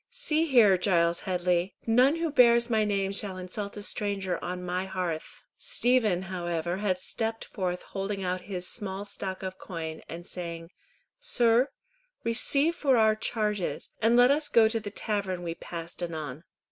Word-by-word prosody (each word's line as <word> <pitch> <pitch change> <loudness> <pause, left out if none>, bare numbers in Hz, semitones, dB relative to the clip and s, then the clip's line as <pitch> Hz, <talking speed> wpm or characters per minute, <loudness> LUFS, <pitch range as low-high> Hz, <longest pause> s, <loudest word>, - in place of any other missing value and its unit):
"See 330 -10 0
here, 220 - +6
Giles 170 -3 +2
Headley, 180 0 0
none 250 +6 +4
who 330 -1 -1
bears 235 -3 +5
my 220 -1 +3
name 200 -2 0
shall 195 -1 -3
insult 200 +3 -5
a 205 - -5
stranger 200 -3 -2
on 180 0 -4
my 180 +1 -2
hearth." 180 -4 -4 0.2
Stephen 225 -7 +2
however 175 -2 -3
had 195 -2 0
stepped 225 +4 -3
forth 180 -3 -3
holding 195 0 -4
out 180 0 -1
his 180 -2 -2
small 200 -2 -3
stock 190 -2 -5
of 185 0 -5
coin, 160 -3 -6
and 170 +1 -7
saying, 170 -1 -6 0.5
"Sir, 250 - +3 0.5
receive 275 +8 +3
for 270 -6 +3
our 220 -1 +5
charges, 210 -3 -2
and 230 +2 +4
let 245 +2 +7
us 295 +1 +1
go 225 -2 +6
to 225 +1 0
the 210 -1 -6
tavern 200 -4 -2
we 170 -1 -3
passed 170 0 -7
anon." 155 -3 -5
195 Hz, 160 wpm, -28 LUFS, 180-230 Hz, 0.5 s, let